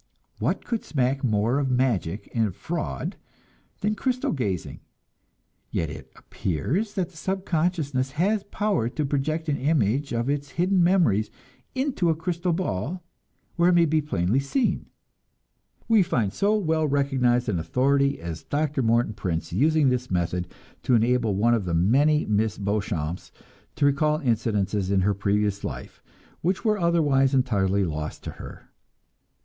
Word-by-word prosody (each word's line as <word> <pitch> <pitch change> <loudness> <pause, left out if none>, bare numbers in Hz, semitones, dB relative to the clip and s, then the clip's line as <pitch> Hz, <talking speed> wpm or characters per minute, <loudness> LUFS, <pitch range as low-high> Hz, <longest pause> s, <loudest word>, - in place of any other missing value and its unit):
What - - -1
could 230 -2 -2
smack 135 -1 0
more 115 +2 +1
of 135 -2 0
magic 120 -8 0
and 110 -6 0
fraud 80 - -4 0.6
than 210 +2 +1
crystal 250 +3 -1
gazing? 100 - -3 0.9
Yet 80 -2 -2
it 80 - -10
appears 165 - -2
that 185 -4 -1
the 165 - -16
subconsciousness 160 -7 -1
has 195 +7 +1
power 200 - 0
to 150 +3 -2
project 150 +4 -1
an 145 -2 0
image 140 -1 +1
of 120 +1 -1
its 145 0 -2
hidden 180 +1 +3
memories 165 - +3 0.5
into 260 -10 0
a 160 - +2
crystal 175 +2 -2
ball, 165 - -2 0.5
where 170 +1 +4
it - - +4
may 170 -1 +5
be 155 0 +2
plainly 115 - 0
seen. 185 - -1 1.0
We 225 -3 +5
find 115 - 0
so 205 - +2
well 160 -5 +1
recognized 130 -4 +1
an 100 -6 0
authority 140 +9 +1
as 85 -1 -6
Dr. 145 -1 -1
Morton 115 -1 +2
Prince 85 -5 -3
using 150 - +3
this 125 0 -1
method 90 0 -1 0.3
to 125 - +2
enable 115 -2 +2
one 115 +4 +3
of 110 -5 0
the 85 -2 -1
many 140 - +3
Miss 110 0 0
Beauchamps 100 -5 -2 0.4
to - - +1
recall 150 +2 +2
incidents 110 - 0
in 100 -1 +1
her 100 +2 +2
previous 100 +1 0
life - - -7 0.4
which 180 +3 -1
were 215 -2 +2
otherwise 145 -6 +3
entirely 100 -6 +2
lost 75 -3 -4
to - - -5
her. - - -11
135 Hz, 150 wpm, -25 LUFS, 105-160 Hz, 1.0 s, may